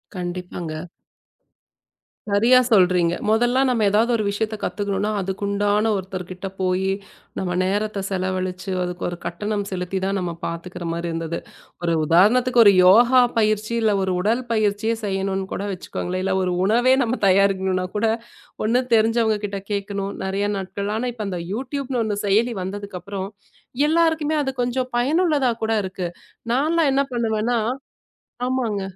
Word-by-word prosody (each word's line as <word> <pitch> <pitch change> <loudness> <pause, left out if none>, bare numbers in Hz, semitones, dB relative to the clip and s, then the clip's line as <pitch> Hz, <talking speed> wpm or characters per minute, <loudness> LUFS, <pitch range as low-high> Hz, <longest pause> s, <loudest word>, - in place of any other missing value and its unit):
கண்டிப்பாங்க. 175 -2 -5 1.4
சரியா 220 +5 +5
சொல்றீங்க. 180 -5 +4 0.2
முதல்லா 240 +4 +3
நாம 240 -4 +1
எதாவது 220 +4 +2
ஒரு 220 - 0
விஷயத்த 215 +2 -2
பத்துக்கணும்னா 205 0 -1
அதுக்கு 190 +1 -4
உண்டான 205 +2 +1
ஒருத்தர் 185 -1 -5
கிட்ட 185 +1 -6
போயி 185 +1 +1 0.5
நம்ம 185 -2 -2
நேரத்த 205 +2 -1
செலவழிச்சு, 185 0 -2
அதுக்கு 180 0 -5
ஒரு 175 - -6
கட்டணம் 205 +4 -2
செலுத்திதான் 190 +1 -2
நாம 175 -2 -3
பார்த்துக்கிற 170 +1 -6
மாரி 170 +1 -3
இருந்தது. 165 0 -3 0.4
ஒரு 170 -1 +1
உதாரணத்துக்கு 235 - +4
ஒரு 200 - +8
யோகா 240 +7 +7 0.2
பயிற்சி, 215 0 +1
இல்ல 220 -1 +3
ஒரு 190 - 0
உடல் 230 +6 +1
பயிற்சியை 215 0 +1
செய்யணும்னு 195 -1 -1
கூட - - -3
வச்சுக்கோங்களேன். 185 0 -4
இல்ல 190 0 0
ஒரு 180 - 0
உணவே 240 +5 +4
நாம 245 +2 -2
தயார் 195 +1 +4
செய்யணும்னா 185 -1 -1
கூட, 225 - +1 0.6
ஒண்ணு 240 +4 +2
தெரிஞ்சவங்க 225 -1 +3
கிட்ட 200 -1 -5
கேட்கணும். 200 0 -3
நறைய 195 +2 -1
நாட்கள். 200 +1 -4
ஆனா 245 +3 -2
இப்ப 220 -3 -5
அந்த 180 -3 -3
YouTube 265 +4 -4
ன்னு 250 -2 0
ஒன்னு 205 -2 -2
செயலி 225 +5 +2
வந்ததுக்கு 200 0 -5
அப்புறம் 195 0 -5 0.6
எல்லாருக்குமே 320 -1 +2
அது 270 - -1
கொஞ்சம் 250 +1 -1
பயனுள்ளதா 290 +1 +2
கூட 220 - 0
இருக்கு. 185 -1 -4 0.4
நான்லாம் 305 +4 +2
என்ன 275 - +3
பண்ணுவேன்னா 230 0 0 0.9
ஆமாங்க. 240 -6 -1
205 Hz, 145 wpm, -22 LUFS, 185-230 Hz, 1.4 s, ஒரு